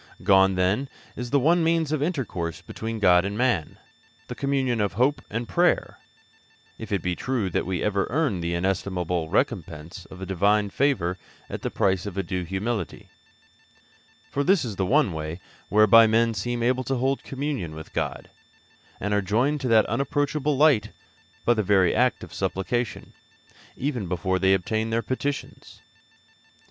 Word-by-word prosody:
Gone, 95 0 +5
then, 100 +9 +1 0.3
is 125 0 -5
the 140 +2 +3
one 165 +5 +3
means 165 -2 +1
of 155 -3 0
intercourse 120 - -3
between 115 0 -5
God 90 -4 +5
and 100 +2 -3
man 120 -11 0 0.5
the - - -3
communion 135 -4 0
of 100 -2 0
hope 135 +6 +1
and 115 +2 -3
prayer 95 - +1 0.8
if 110 -2 -8
it 100 -4 0
be 90 -1 -1
true 115 -6 -2
that - - -1
we 95 -3 -2
ever 100 -2 0
earn 135 - 0
the 85 +1 -2
inestimable 90 -2 -1
recompense 80 +6 -2
of 95 - -12
the 95 - -6
Divine 100 +2 +1
favour 95 -11 0 0.3
at - - -5
the - - -2
price 95 0 0
of 100 -2 -7
a 95 - 0
due 90 +1 -3
humility; 95 +2 -4 1.2
for 140 - 0
this 185 -2 +3
is 110 -4 -5
the 95 -1 -1
one 135 - +3
way 80 +2 -5 0.3
whereby 110 +2 +7
men 115 +1 +2
seem 120 +3 -2
able 130 +2 +1
to 135 - -1
hold 135 +2 0
communion 135 - -4
with 80 0 -10
God, - - -3 0.7
and 105 +1 -2
are 105 - +2
joined 125 +10 +1
to 130 - -2
that 110 -2 +5
unapproachable 145 +1 0
light 135 -9 +4 0.6
by 120 - +5
the 110 - 0
very 95 -3 +3
act 125 0 +1
of 85 -2 -10
supplication, 95 +6 -3 0.6
even 125 -8 -2
before 95 +1 -1
they 95 0 +4
obtain 110 +4 -2
their 115 +1 0
petitions. 140 +5 -4
105 Hz, 165 wpm, -25 LUFS, 95-130 Hz, 1.2 s, whereby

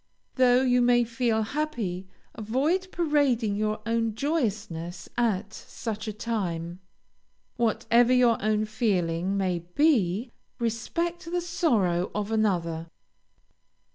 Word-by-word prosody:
Though 255 0 +4
you 250 -1 +3
may 240 0 +4
feel 230 -1 0
happy, 220 -9 -3 0.3
avoid 280 - 0
parading 280 -10 +1
your 215 +1 -1
own 230 -1 0
joyousness 210 - -2
at 220 -3 0
such 220 -1 -6
a - - -1
time; 180 -6 -3 0.8
whatever 235 +1 +3
your 245 -3 +4
own 215 0 +1
feeling 195 -4 0
may 185 -3 0
be, 210 - +1 0.3
respect 265 +10 -2
the 355 +1 0
sorrow 225 - +1
of 210 +1 -2
another. 170 -7 0
225 Hz, 110 wpm, -27 LUFS, 195-250 Hz, 0.8 s, Though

